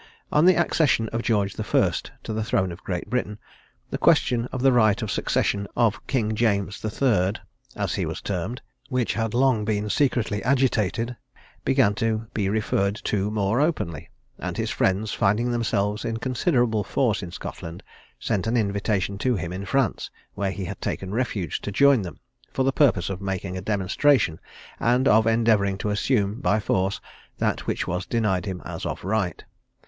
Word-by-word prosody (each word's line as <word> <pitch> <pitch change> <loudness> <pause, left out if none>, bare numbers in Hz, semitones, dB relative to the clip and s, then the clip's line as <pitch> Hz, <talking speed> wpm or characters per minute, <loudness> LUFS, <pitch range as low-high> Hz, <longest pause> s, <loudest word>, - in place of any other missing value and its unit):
On 150 +2 +4
the 185 0 +7
accession 150 -9 +2
of 115 - -2
George 100 -4 +1
the - - -4
First - - +1
to 110 - -4
the 110 0 -1
throne 95 -4 0
of 85 - -10
Great 90 -2 -3
Britain, 105 -4 -2 0.5
the - - -2
question 120 -1 +3
of 130 -1 -3
the 135 - +6
right 110 -4 +4
of 105 - -3
succession 100 0 0
of 115 -2 +1
King 110 -5 0
James 100 -3 0
the 110 - -2
Third, 105 -5 +1 0.4
as - - -1
he - - -1
was - - -4
termed, 100 +6 -4 0.3
which 125 -3 0
had 115 0 -2
long 125 -4 +3
been 105 0 -1
secretly 120 -7 +1
agitated, 120 -3 +1 0.5
began 130 -6 +3
to 110 +1 -1
be 100 -3 0
referred 100 -1 0
to 100 0 0
more 105 +3 +1
openly; 105 - -1 0.3
and - - -4
his - - -1
friends, 100 +3 0
finding 110 +3 +1
themselves 105 -3 0
in 115 -1 -2
considerable 120 -3 +1
force 110 +1 0
in 90 - -6
Scotland, 85 0 -7 0.4
sent 105 -2 -1
an 120 +2 +1
invitation 100 -2 0
to 125 +2 +1
him 85 -2 -4
in 95 +2 -5
France, 135 -4 0 0.2
where 100 -1 -1
he 95 0 -4
had 95 +1 -7
taken 95 +1 -3
refuge, 105 - -2
to 105 - -4
join 140 +3 +5
them, 90 -6 -7 0.3
for 135 - 0
the 135 +1 +1
purpose 100 - +3
of 95 0 -5
making 95 -1 -3
a 95 - -4
demonstration, 105 - +2 0.4
and 125 +3 +2
of 110 +1 +5
endeavouring 110 -4 +3
to 105 +1 -2
assume 105 0 0
by 110 -5 +2
force, 95 -1 0 0.4
that - - -1
which - - -1
was 90 +3 -2
denied 105 -6 0
him 95 -2 -5
as - - -6
of - - -4
right. 100 -2 -1
105 Hz, 180 wpm, -24 LUFS, 100-120 Hz, 0.5 s, the